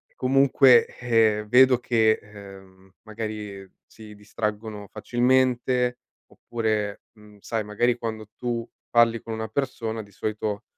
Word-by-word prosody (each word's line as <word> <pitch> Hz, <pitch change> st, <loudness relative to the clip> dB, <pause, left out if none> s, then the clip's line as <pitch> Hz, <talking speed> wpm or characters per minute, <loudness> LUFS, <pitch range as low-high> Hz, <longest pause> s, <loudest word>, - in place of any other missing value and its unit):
comunque, 135 Hz, -1 st, +5 dB
eh, 110 Hz, -3 st, +2 dB
vedo 125 Hz, +3 st, +6 dB
che, 110 Hz, -3 st, +2 dB
ehm, 95 Hz, -2 st, -15 dB
magari 105 Hz, -3 st, -7 dB, 0.2 s
si 110 Hz, -1 st, -14 dB
distraggono 105 Hz, 0 st, -5 dB
facilmente 125 Hz, +1 st, +1 dB, 0.3 s
oppure 110 Hz, -3 st, -3 dB
mhmm, 105 Hz, -1 st, -18 dB
sai, 110 Hz, +2 st, -3 dB
magari 115 Hz, +4 st, 0 dB
quando 110 Hz, -2 st, -5 dB
tu 120 Hz, -1 st, -3 dB, 0.2 s
parli 115 Hz, -1 st, +3 dB
con 115 Hz, -, -8 dB
una 110 Hz, 0 st, -4 dB
persona 115 Hz, -2 st, -3 dB
di 100 Hz, -, -18 dB
solito 105 Hz, 0 st, -4 dB
110 Hz, 115 wpm, -24 LUFS, 105-120 Hz, 0.3 s, vedo